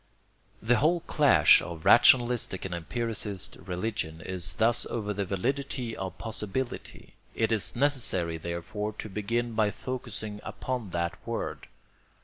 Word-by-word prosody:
The 120 Hz, +2 st, +4 dB
whole 170 Hz, +3 st, +3 dB
clash 140 Hz, -, +6 dB
of 85 Hz, -2 st, -7 dB
rationalistic 120 Hz, -6 st, +5 dB
and 95 Hz, -, -4 dB
empiricist 105 Hz, +2 st, -3 dB
religion 90 Hz, -3 st, -3 dB
is 95 Hz, +2 st, -4 dB
thus 115 Hz, +1 st, +2 dB
over 105 Hz, -3 st, -2 dB
the 100 Hz, 0 st, -2 dB
validity 125 Hz, +5 st, -2 dB
of 95 Hz, -1 st, -5 dB
possibility. 115 Hz, +2 st, -4 dB, 0.2 s
It 110 Hz, 0 st, +1 dB
is 110 Hz, -3 st, +1 dB
necessary 120 Hz, -, +1 dB
therefore 85 Hz, +6 st, -4 dB
to 110 Hz, -, -7 dB
begin 115 Hz, +4 st, -1 dB
by 110 Hz, -2 st, +2 dB
focusing 110 Hz, -3 st, -5 dB
upon 125 Hz, -6 st, -4 dB
that 85 Hz, -1 st, -2 dB
word. -, -, -4 dB
110 Hz, 130 wpm, -28 LUFS, 95-120 Hz, 0.2 s, clash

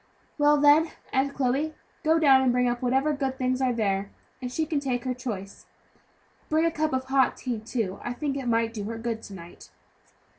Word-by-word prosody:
"Well, 295 Hz, 0 st, +5 dB
then, 295 Hz, +3 st, +5 dB, 0.2 s
Aunt 275 Hz, +1 st, +1 dB
Chloe, 280 Hz, +4 st, 0 dB, 0.3 s
go 320 Hz, +1 st, +4 dB
down 275 Hz, -5 st, +6 dB
and 260 Hz, -1 st, +3 dB
bring 250 Hz, 0 st, +2 dB
up 240 Hz, 0 st, -1 dB
whatever 265 Hz, +4 st, +2 dB
good 270 Hz, -2 st, -2 dB
things 255 Hz, 0 st, 0 dB
are 260 Hz, -1 st, +2 dB
there, 200 Hz, -4 st, -1 dB, 0.3 s
and 250 Hz, -1 st, -4 dB
she 315 Hz, +5 st, -1 dB
can 305 Hz, -2 st, -1 dB
take 255 Hz, -4 st, -2 dB
her 255 Hz, -1 st, -1 dB
choice. 215 Hz, -6 st, -7 dB, 0.8 s
Bring 315 Hz, +1 st, +2 dB
a 335 Hz, -, +2 dB
cup 310 Hz, -1 st, -1 dB
of 260 Hz, 0 st, -1 dB
hot 265 Hz, -1 st, +2 dB
tea, 245 Hz, -4 st, -3 dB
too, 220 Hz, -3 st, -3 dB
I 245 Hz, -, -3 dB
think 280 Hz, +2 st, -3 dB
it 270 Hz, -3 st, -4 dB
may 230 Hz, -1 st, +2 dB
do 220 Hz, -3 st, -6 dB
her 225 Hz, +2 st, -4 dB
good 225 Hz, -1 st, -3 dB
to 200 Hz, -, -10 dB
night." 170 Hz, -1 st, -12 dB
255 Hz, 210 wpm, -26 LUFS, 235-285 Hz, 0.8 s, down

